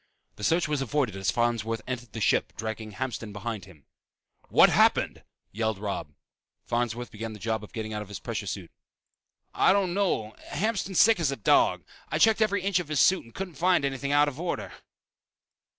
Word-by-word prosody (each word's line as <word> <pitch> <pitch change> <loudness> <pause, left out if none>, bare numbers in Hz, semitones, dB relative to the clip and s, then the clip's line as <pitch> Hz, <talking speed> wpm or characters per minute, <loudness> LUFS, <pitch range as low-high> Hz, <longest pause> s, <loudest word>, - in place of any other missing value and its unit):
The 105 - -9
search 165 +7 +2
was 150 -2 -1
avoided 135 -5 0
as 95 -2 -1
Farnsworth 115 -2 0
entered 120 -3 -5
the 115 - -5
ship 100 - +2
dragging 110 0 -5
Hamston 115 -2 -4
behind 105 0 -5
him. 80 -8 -18 0.6
"What - - +7
happened!" - - +3 0.3
yelled 110 0 -1
Robb. 100 -7 -5 0.5
Farnsworth 120 0 -2
began 110 +1 -6
the - - -9
job 110 0 -2
of 105 - -11
getting 110 -1 -5
out 105 - -3
of 105 - -8
his 100 - -6
pressure 110 -3 -5
suit. 95 -3 -5 0.8
"I - - +4
don't 195 -3 +1
know. 175 - 0
Hamston's 195 +1 -1
sick 225 -3 +6
as 160 -5 +1
a 140 - -1
dog. 110 - +3 0.3
I - - 0
checked 220 0 +4
every 205 -3 +2
inch 195 -2 +2
of 175 - -5
his 155 -2 -1
suit 190 +1 +4
and 115 - -18
couldn't 190 -2 -5
find 180 -4 +3
anything 140 0 -2
out 145 0 +5
of 145 0 -5
order." 175 - -3
120 Hz, 190 wpm, -27 LUFS, 110-165 Hz, 0.8 s, What